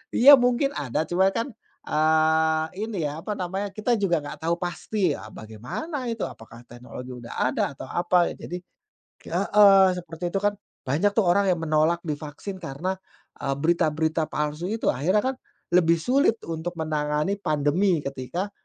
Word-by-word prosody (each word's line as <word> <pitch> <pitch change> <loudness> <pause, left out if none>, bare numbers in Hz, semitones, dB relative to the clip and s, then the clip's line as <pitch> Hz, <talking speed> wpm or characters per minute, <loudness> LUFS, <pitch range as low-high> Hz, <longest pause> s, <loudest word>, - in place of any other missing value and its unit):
Iya, 280 +4 +9
mungkin 250 +3 +2
ada, 145 +1 -1
cuma 190 +2 +3
kan, 230 +4 -1 0.4
eee, 160 0 +3 0.2
ini, 220 -3 -4
ya, 150 +2 -5
apa 210 - -4
namanya, 190 +3 -3
kita 220 +4 0
juga 175 -5 +2
nggak 145 - -8
tau 170 +1 +1
pasti, 180 -1 -1
ah, - - -9
bagaimana 125 - -6
itu, 225 - -3
apakah 115 +1 -13
teknologi 125 +1 -9
udah 120 -1 -10 0.2
ada 135 - 0
atau 130 - -8
apa, 175 0 +2
ya, - - -8
jadi 180 - -4 0.7
heeh, 200 -2 +6
seperti 170 0 -6
itu 195 - +1
kan 205 0 +2 0.3
banyak, 160 +10 +2
tuh, 220 - +3
orang 200 +2 +3
yang 175 -2 0
menolak 155 +2 +2
divaksin 155 +6 -5
karena, 165 +6 -3 0.5
eee, 135 - -1
berita-berita 160 0 +1
palsu 150 +3 -2
itu. 225 - -1
Akhirnya 185 +11 +1
kan 260 0 -1 0.4
lebih 170 -2 +4
sulit 255 - +3 0.2
untuk 165 +2 -4
menangani 155 +4 -1
pandemi 155 +2 +1
ketika 140 - -4
170 Hz, 160 wpm, -25 LUFS, 150-195 Hz, 0.7 s, Iya